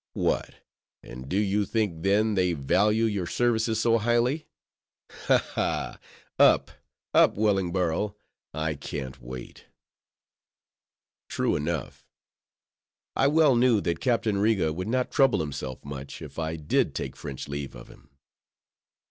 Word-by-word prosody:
"What! - - -1 0.5
and 65 +2 -9
do 95 - 0
you 105 0 +1
think, 100 -6 -1
then, 105 +4 +2
they 90 -3 +2
value 105 +10 +2
your 100 -5 -1
services 115 -1 +1
so 115 0 +3
highly? 120 +7 +1 0.8
Ha! - - +6 0.2
ha! - - -2 0.4
Up, - - +5 0.4
up, - - +5
Wellingborough: 95 -2 0 0.4
I 80 +1 -2
can't 70 -2 -6
wait." - - -9 1.6
True - - 0
enough. 85 +3 -3 1.1
I 135 - +3
well 150 -2 +4
knew 120 -2 +4
that 85 -2 -1
Captain 110 -4 +1
Riga 100 -7 +2
would 90 +4 -4
not 125 +2 0
trouble 135 -2 +4
himself 70 -4 -5
much, 70 -1 -7
if - - -9
I 80 0 -2
did 75 -2 0
take - - -4
French 70 -3 -7
leave 70 -2 -5
of - - -11
him. 70 - -18
95 Hz, 130 wpm, -27 LUFS, 75-110 Hz, 1.6 s, Ha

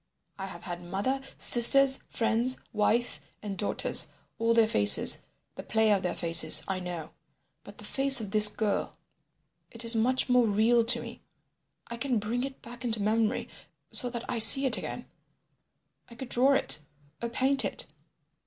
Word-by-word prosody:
I 195 - -7
have 195 - -13
had 175 -2 -8
mother, 200 +10 -5 0.2
sisters, 265 +3 +3
friends, 235 +3 -2 0.2
wife 225 +3 -2 0.2
and 200 -2 -7
daughters—all 230 +3 -3
their 230 -1 +3
faces, 105 - +3 0.3
the - - -10
play 220 -1 -1
of 200 -2 0
their 180 - -5
faces, 165 -2 +3
I 190 -1 -5
know. 175 -3 -9 0.5
But - - -16
the - - -15
face 270 -1 +3
of 210 -3 -9
this 210 0 +7
girl—it 220 +2 -8
is 230 0 0
much 250 +4 -1
more 250 -2 +1
real 225 +3 0
to 240 +1 0
me. - - -13 0.6
I 235 - -10
can 255 0 -3
bring 225 +4 -5
it 270 0 -10
back 240 +1 -13
into 225 -3 -3
memory 215 +1 -2 0.4
so 245 - +2
that 235 -1 -9
I 240 - -5
see 270 +5 +10
it 260 - +3
again—I 235 - -16
could 260 +1 -11
draw 260 +4 +1
it 270 - +1 0.4
or 235 - -5
paint 265 +3 0
it. - - -4
230 Hz, 160 wpm, -26 LUFS, 210-250 Hz, 0.6 s, see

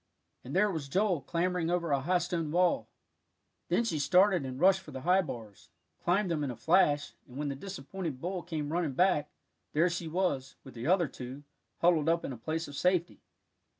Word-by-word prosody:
And 130 +5 -7
there 205 +2 +4
was 155 -6 -4
Joel 185 -1 +1
clambering 170 +3 -1
over 170 -2 0
a 140 - +3
high 175 +7 +2
stone 170 -2 -2
wall. 175 +2 +2 0.8
Then - - +2
she 185 -10 -1
started 180 0 +4
and 130 0 -6
rushed 190 +2 +5
for 185 - -14
the 130 -2 -7
high 180 +5 +4
bars, 110 - -9 0.3
climbed 180 +1 +2
them 155 -3 0
in 140 - -2
a 125 - -4
flash, 145 - +2
and 125 0 -11
when 145 0 -2
the 140 - -3
disappointed 175 -2 -6
bull 180 +4 -3
came 155 -3 -4
running 170 -5 0
back, 160 -2 +2 0.4
there 170 +4 +3
she 170 -1 -3
was, 160 -6 -1
with 135 - -12
the 120 +3 -5
other 175 -2 +4
two, 130 +2 -8 0.4
huddled 165 -3 +4
up 170 0 +1
in 135 - -4
a - - -6
place 160 +7 -3
of 145 - -9
safety. 180 +1 +1
165 Hz, 200 wpm, -31 LUFS, 140-180 Hz, 0.8 s, rushed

